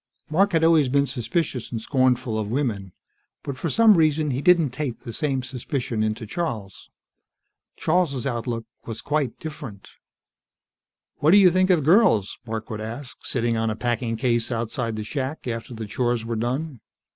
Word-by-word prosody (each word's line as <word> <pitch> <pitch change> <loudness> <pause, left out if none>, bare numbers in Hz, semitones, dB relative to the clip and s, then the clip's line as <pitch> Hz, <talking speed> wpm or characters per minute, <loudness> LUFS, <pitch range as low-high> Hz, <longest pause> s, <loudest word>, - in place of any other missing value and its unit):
Mark 195 +4 +3
had 165 -1 +3
always 160 -5 +5
been 140 +2 +3
suspicious 135 0 -2
and 115 - -2
scornful 125 -2 +1
of 105 -1 -3
women. 110 -7 -2 0.5
But 140 - -4
for 165 +5 -3
some 220 +3 +6
reason 155 -2 +2
he 130 +2 -2
didn't 170 -5 +4
tape 130 -2 -4
the 115 - -7
same 135 -3 -1
suspicion 125 -2 -3
into 110 +1 -1
Charles. 110 - -5 0.9
Charles' 155 -6 +1
outlook 120 -3 -2 0.2
was 110 -1 -5
quite 145 -4 -1
different. 135 -10 -8 1.3
"What 150 - +2
do 190 - +8
you 190 -3 +7
think 185 +1 +2
of 170 -6 +3
girls?" 160 - +4
Mark 110 0 -5
would 110 -1 -4
ask, 120 +5 -8
sitting 120 -2 0
on 115 0 0
a 110 - -2
packing 120 0 -1
case 120 +1 0
outside 115 0 -2
the 110 - -4
shack, 135 +5 -4
after 115 0 -4
the 110 0 -5
chores 120 +2 -1
were 115 0 -2
done. 130 +5 -2
125 Hz, 170 wpm, -24 LUFS, 115-150 Hz, 1.3 s, do